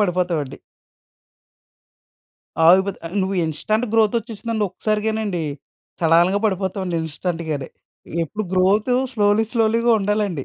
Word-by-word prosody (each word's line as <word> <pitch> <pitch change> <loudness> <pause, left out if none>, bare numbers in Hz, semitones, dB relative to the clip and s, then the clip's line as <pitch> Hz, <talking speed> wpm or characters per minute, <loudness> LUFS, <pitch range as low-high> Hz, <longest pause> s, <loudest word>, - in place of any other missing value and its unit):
పడిపోతామండి. 175 -7 -1 2.1
ఆగిపోతే 190 +3 +4
ఆహ్, 180 +5 -6
నువ్వు 190 0 -2
ఇన్‌స్టంట్ 215 +10 -1
గ్రోత్ 220 -1 +3
వచ్చేసిందంటే 225 -1 -3
ఒక్కసారిగానండి. 215 -2 -1 0.6
సడాలుగా 170 +4 +4
పడిపోతామండి 190 -3 -1
ఇన్‌స్టంట్‌గానే. 160 -3 -3 0.6
ఎప్పుడు 215 +7 -5
గ్రోత్ 195 +6 +2 0.2
స్లోలీ 205 0 +2
స్లోలీగా 230 0 +2
ఉండాలండి. 200 -7 -1
195 Hz, 90 wpm, -21 LUFS, 175-215 Hz, 2.1 s, ఆగిపోతే